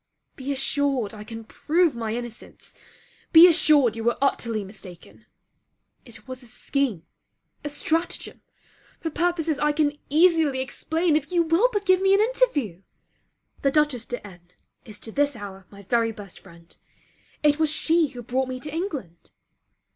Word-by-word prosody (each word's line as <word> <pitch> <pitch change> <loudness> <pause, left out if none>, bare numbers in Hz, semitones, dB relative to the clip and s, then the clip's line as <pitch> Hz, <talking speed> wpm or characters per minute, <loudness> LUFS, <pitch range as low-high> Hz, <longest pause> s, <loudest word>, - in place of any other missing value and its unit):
Be 270 +1 -5
assured 270 -4 0
I 210 -1 -9
can 225 +1 -8
prove 315 +6 +1
my 225 -1 -3
innocence. 240 -1 -8 0.6
Be 330 +2 +10
assured 300 -8 +4
you 225 - -5
were 235 +1 +1
utterly 230 -6 0
mistaken. 190 -3 -12 0.8
It 230 -2 -13
was 255 0 -7
a 245 - -11
scheme, 245 - -2 0.6
a 295 - -3
stratagem 320 +4 -2 0.6
for 325 - -4
purposes 330 -2 0
I 300 0 +2
can 295 -1 +1
easily 320 -3 +3
explain 320 +5 -1
if 305 +2 -1
you 345 -1 +3
will 335 +9 +3
but 410 -3 -2
give 370 0 +4
me 390 0 +4
an - - +2
interview. 415 - +1 0.8
The 275 - +3
Dutchess 280 -5 +1
de 245 -3 -6
N 175 -3 -14 0.4
is 215 -4 -10
to 225 - -8
this 285 +2 +1
hour 195 -3 -9
my 200 0 -14
very 230 +3 +1
best 205 -4 -10
friend; 170 -2 -16 0.7
it 295 0 +3
was 315 -1 +2
she 320 +1 +2
who 245 -3 -10
brought 255 +3 -1
me 255 0 -5
to 295 +1 -7
England. 285 - -5
275 Hz, 160 wpm, -24 LUFS, 225-320 Hz, 0.8 s, Be